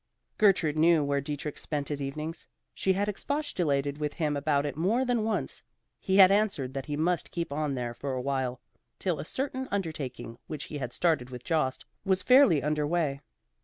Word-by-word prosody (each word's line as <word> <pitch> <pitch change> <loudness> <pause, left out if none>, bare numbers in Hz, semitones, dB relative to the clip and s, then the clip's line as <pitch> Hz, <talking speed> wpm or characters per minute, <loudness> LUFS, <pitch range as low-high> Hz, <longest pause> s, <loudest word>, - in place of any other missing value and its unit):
Gertrude 175 -7 +3
knew 165 -1 +5
where 140 0 0
Dietrich 145 +1 -5
spent 145 -2 -3
his 145 -1 -3
evenings. 150 +4 -5 0.3
She 190 - +1
had 200 +2 0
expostulated 175 - -1
with 150 -1 -2
him 150 -3 -1
about 145 0 +1
it 145 - -3
more 210 - +1
than 245 -3 +1
once. 220 -1 -2 0.4
He 190 0 +1
had 190 -1 +9
answered 195 -11 +1
that 135 +1 -5
he 145 -1 -2
must 170 +3 0
keep 170 -4 -3
on 150 -2 -1
there 120 -2 -3
for 135 +2 -4
awhile, 130 -1 -2 0.4
till 175 -6 -1
a - - -5
certain 265 - -3
undertaking 140 - -4
which 155 -1 -5
he 150 - -6
had 125 -3 -4
started 155 -5 +1
with 125 -1 -8
Jost 155 -6 0 0.2
was 190 -1 +1
fairly 250 - +6
under 150 0 0
way. 150 -4 0
150 Hz, 185 wpm, -29 LUFS, 140-185 Hz, 0.4 s, had